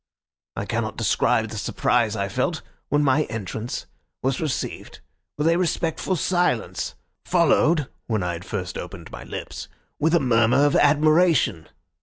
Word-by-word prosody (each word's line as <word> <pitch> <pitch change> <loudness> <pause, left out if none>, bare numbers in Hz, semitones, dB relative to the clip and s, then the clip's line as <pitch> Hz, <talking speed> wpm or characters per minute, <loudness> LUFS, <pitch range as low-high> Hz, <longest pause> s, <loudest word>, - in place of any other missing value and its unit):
I - - -3
cannot - - -2
describe 110 -1 +2
the 110 -1 -5
surprise 115 0 +1
I 100 -2 -1
felt 100 - -1 0.3
when 145 +1 +2
my 145 +2 +3
entrance 110 +1 -5 0.4
was 135 +3 0
received 155 -4 -4 0.4
with 150 +2 +1
a 165 +1 +4
respectful 175 +1 0
silence, 180 +2 0 0.3
followed 165 -4 +3 0.2
(when 110 -5 0
I 90 0 -1
had 85 +1 -7
first 95 -3 -4
opened - - -8
my - - -8
lips) - - -7 0.3
with 160 +3 +3
a - - +5
murmur 125 +1 +3
of 145 - +2
admiration. 150 - +3
135 Hz, 145 wpm, -23 LUFS, 110-160 Hz, 0.4 s, a